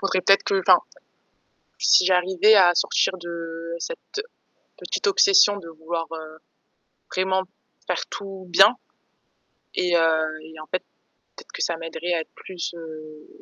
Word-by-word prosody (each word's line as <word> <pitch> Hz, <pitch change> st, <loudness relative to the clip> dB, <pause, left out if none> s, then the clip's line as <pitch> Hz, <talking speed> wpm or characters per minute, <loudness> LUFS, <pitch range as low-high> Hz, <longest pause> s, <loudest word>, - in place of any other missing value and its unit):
Faudrait 190 Hz, -1 st, 0 dB
peut-être 195 Hz, +2 st, +5 dB
que 195 Hz, -, +1 dB
enfin, 185 Hz, -1 st, +5 dB, 1.0 s
si -, -, +5 dB
j'arrivais 185 Hz, +3 st, +4 dB
à 180 Hz, -3 st, +6 dB
sortir 185 Hz, -, +1 dB
de 170 Hz, -1 st, -7 dB
cette 430 Hz, -, -6 dB, 0.6 s
petite -, -, -3 dB
obsession 395 Hz, -, +5 dB
de 170 Hz, -4 st, -11 dB
vouloir, 165 Hz, +1 st, -5 dB
heu, 155 Hz, -1 st, -9 dB, 0.8 s
vraiment 190 Hz, 0 st, 0 dB, 0.4 s
faire -, -, -2 dB
tout 195 Hz, -1 st, -8 dB
bien 195 Hz, +7 st, +6 dB, 1.0 s
et 180 Hz, -1 st, 0 dB
heu, 160 Hz, -1 st, +1 dB
et 160 Hz, 0 st, -13 dB
en 155 Hz, -, -11 dB
fait, 185 Hz, -, -3 dB, 0.5 s
peut-être -, -, -14 dB
que -, -, -8 dB
ça 170 Hz, -, -1 dB
m'aiderait 165 Hz, +2 st, -4 dB
à 165 Hz, -, 0 dB
être -, -, -18 dB
plus, 180 Hz, -2 st, -7 dB
heu 155 Hz, -2 st, -11 dB
175 Hz, 145 wpm, -23 LUFS, 165-190 Hz, 1.0 s, à